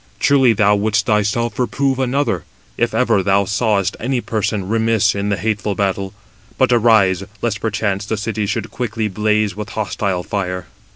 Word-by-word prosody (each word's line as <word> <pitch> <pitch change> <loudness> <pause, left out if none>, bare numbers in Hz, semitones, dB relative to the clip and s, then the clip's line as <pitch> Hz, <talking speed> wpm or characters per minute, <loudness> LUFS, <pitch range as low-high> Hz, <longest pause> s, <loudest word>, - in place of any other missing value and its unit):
Truly 135 -4 +4
thou 105 0 +3
wouldst 105 +1 +1
thyself 105 +2 0
reprove 135 +1 0
another, 130 - 0 0.3
if 120 0 0
ever 115 -4 +3
thou 100 +1 +2
sawest 100 -2 0
any 130 +1 -1
person 105 -4 -2
remiss 110 -2 +2
in 100 0 -2
the 100 - 0
hateful 105 +1 -1
battle. 95 -1 -2 0.4
But - - +3
arise, 110 -5 +4 0.2
lest 110 -3 -1
perchance 105 -2 -1
the 110 - -1
city 105 0 -2
should 105 - -3
quickly 115 -3 -2
blaze 105 +1 0
with 105 +1 -6
hostile 95 -2 -1
fire." 90 -2 -3
105 Hz, 160 wpm, -18 LUFS, 100-115 Hz, 0.4 s, Truly